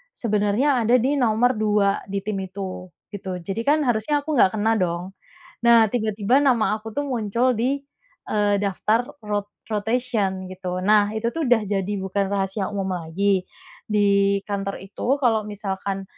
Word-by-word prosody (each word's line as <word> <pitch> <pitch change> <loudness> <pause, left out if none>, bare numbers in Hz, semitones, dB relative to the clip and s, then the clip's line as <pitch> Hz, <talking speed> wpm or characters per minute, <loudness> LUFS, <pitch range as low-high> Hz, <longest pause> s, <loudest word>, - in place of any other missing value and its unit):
sebenarnya 225 +5 +1
ada 240 +3 +4
di 280 +4 +1
nomor 240 0 +3
2 205 -2 +2
di 195 0 -3
tim 205 -1 -3
itu, 185 -1 -6 0.2
gitu. 190 -3 -5
Jadi 195 +5 -3
kan 300 +1 +4
harusnya 260 +4 0
aku 310 - -4
nggak 195 -3 +4
kena 220 +1 +1
dong. 175 +1 -2 0.5
Nah, 235 -1 +6
tiba-tiba 220 +3 +1
nama 240 -6 +3
aku 225 +1 -8
tuh 285 - 0
muncul 240 0 +1
di, 255 +5 0 0.5
eee, 205 -1 +2
daftar 205 +4 +1 0.2
rot 205 -1 -2 0.2
rotation 215 -3 -1
gitu. 185 -1 -4
Nah, 210 0 +4
itu 230 +2 0
tuh 325 -1 -2
udah 240 -2 +5
jadi 200 0 -2
bukan 190 +1 -1
rahasia 195 0 -1
umum 195 -1 -2
lagi, 185 +3 0 0.4
di 200 -1 +3
kantor 195 -1 -3
itu 240 +7 -1
kalau 225 -5 +2
misalkan 195 -2 -4
210 Hz, 155 wpm, -23 LUFS, 195-235 Hz, 0.5 s, Nah